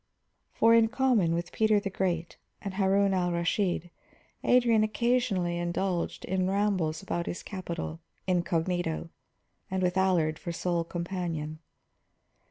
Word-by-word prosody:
For, 230 0 +4
in 230 -1 +6
common 235 -7 +2
with 170 +1 -3
Peter 215 -1 +3
the 200 -1 -4
Great 175 -3 -2 0.2
and 200 -2 -5
Harun 195 0 +3
al 180 -1 +1
Rashid, 175 0 0 0.5
Adrian 235 -3 +4
occasionally 215 -6 +1
indulged 175 +1 -2
in 185 0 0
rambles 190 -6 0
about 170 0 -2
his 175 - -4
capital, 170 -4 -5 0.3
incognito, 175 - -1 0.6
and 190 0 -1
with 180 +1 +1
Allard 170 -5 +2
for 175 - -4
sole 170 0 -1
companion. 170 -3 -4
180 Hz, 125 wpm, -29 LUFS, 170-200 Hz, 0.6 s, in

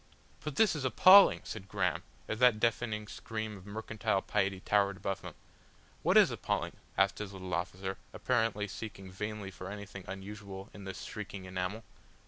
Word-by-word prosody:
"But 150 -2 -4
this 210 0 +4
is 145 - -3
appalling!" 185 +9 +8
said 100 -3 -7
Graham, - - 0 0.3
as 110 - -3
that 125 -4 +6
deafening 110 -2 0
scream 110 -1 -5
of 95 0 -13
mercantile 105 -2 -1
piety 95 -1 0
towered 100 0 +2
above 95 +1 -3
them. - - -8 0.7
"What - - +4
is - - +7
appalling?" - - -2 0.2
asked 100 0 +3
his 105 -2 -5
little 95 -2 -6
officer, 95 +2 -3
apparently 105 -2 0
seeking 95 -2 -7
vainly 105 +1 -5
for 95 +1 -8
anything 100 -2 -8
unusual 100 +1 -7
in 100 -2 -10
this 95 - -6
shrieking 100 -2 -6
enamel. 95 +4 -3
100 Hz, 160 wpm, -32 LUFS, 95-110 Hz, 0.7 s, appalling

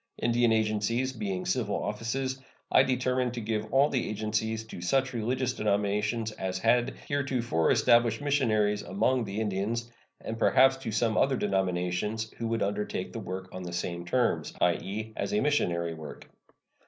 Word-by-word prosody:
Indian 120 0 +3
agencies 110 +4 +1
being 100 -6 -3
civil 110 -6 0
offices, 130 +6 -2 0.3
I - - +7
determined 125 -1 0
to - - -3
give 110 -1 -3
all 135 +2 +5
the 130 - -1
agencies 110 +1 -1
to 110 -5 -9
such 130 +8 +1
religious 125 +2 -1
denominations 105 +2 0
as 95 -3 -3
had 120 +4 +2
heretofore 130 - 0
established 120 -1 +4
missionaries 110 -8 +1
among 115 +7 +1
the 100 +1 -4
Indians, 110 +3 -2 0.3
and 115 0 -6
perhaps 130 +2 +5
to 130 -4 -5
some 110 0 +1
other 135 -1 +3
denominations 95 +3 -1
who 115 - -1
would 115 0 0
undertake 105 +1 -3
the - - -4
work 95 +1 -6
on 95 - -6
the 90 -1 -6
same 85 0 -3
terms 120 +7 0
i.e., 100 +5 -1
as - - -3
a 210 - +3
missionary 85 - +1
work. 80 -3 -9
110 Hz, 155 wpm, -29 LUFS, 100-125 Hz, 0.3 s, I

